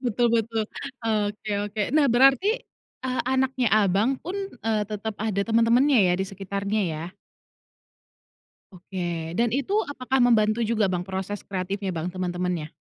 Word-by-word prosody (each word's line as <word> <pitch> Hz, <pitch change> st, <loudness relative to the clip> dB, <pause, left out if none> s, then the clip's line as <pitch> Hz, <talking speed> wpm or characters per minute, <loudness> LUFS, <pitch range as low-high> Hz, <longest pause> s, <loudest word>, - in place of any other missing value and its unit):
Betul 240 Hz, -1 st, +1 dB
betul, 225 Hz, 0 st, -2 dB, 0.4 s
oke 210 Hz, -1 st, -1 dB, 0.2 s
oke. 215 Hz, +1 st, -5 dB, 0.2 s
Nah, 290 Hz, -2 st, +5 dB
berarti, 270 Hz, -, +5 dB, 0.6 s
eee, 255 Hz, 0 st, 0 dB
anaknya 260 Hz, -1 st, +1 dB
abang 210 Hz, +6 st, +2 dB
pun, 360 Hz, +4 st, -4 dB, 0.3 s
eee, 215 Hz, -2 st, +1 dB
tetap 215 Hz, +1 st, -4 dB
ada 210 Hz, -3 st, 0 dB
teman-temannya 230 Hz, +4 st, +4 dB
ya, 175 Hz, -, +3 dB
di 190 Hz, -, -1 dB
sekitarnya, 200 Hz, +2 st, -3 dB
ya? 155 Hz, -1 st, -4 dB, 1.7 s
Oke, 175 Hz, -3 st, -5 dB
dan 235 Hz, 0 st, +1 dB
itu 280 Hz, -, 0 dB
apakah 265 Hz, -2 st, -2 dB
membantu 230 Hz, -2 st, +3 dB
juga, 220 Hz, -2 st, +1 dB
Bang, 180 Hz, -1 st, -2 dB
proses 190 Hz, +2 st, -5 dB
kreatifnya, 195 Hz, 0 st, -3 dB
Bang, 165 Hz, +1 st, -3 dB
teman-temannya? 180 Hz, -3 st, -3 dB
215 Hz, 135 wpm, -25 LUFS, 190-240 Hz, 1.7 s, Nah